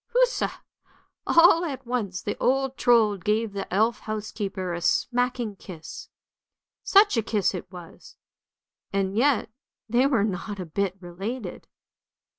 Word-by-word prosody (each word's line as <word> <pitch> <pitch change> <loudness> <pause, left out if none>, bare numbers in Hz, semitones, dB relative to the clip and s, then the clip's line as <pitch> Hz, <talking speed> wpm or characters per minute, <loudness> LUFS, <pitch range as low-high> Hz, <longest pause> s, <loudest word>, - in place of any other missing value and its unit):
Huzza! - - +1 0.6
All 335 0 +6
at 270 -6 -5
once 215 -7 -3
the - - -2
old 270 +1 +1
Trold 220 -7 +3
gave 215 0 0
the 200 - -5
elf 220 +5 +2
housekeeper 205 -4 -4
a 170 - -4
smacking 245 +1 0
kiss, 165 -5 -10 0.7
such 400 - +5
a - - +3
kiss 210 -2 0
it 180 0 -7
was, 175 -3 -12 0.8
and 195 0 -1
yet 245 -2 +2 0.4
they 240 +4 +3
were 250 -8 +2
not 205 0 -3
a 185 - -4
bit 190 +3 -2
related. 190 +4 -6
215 Hz, 130 wpm, -25 LUFS, 190-250 Hz, 0.8 s, All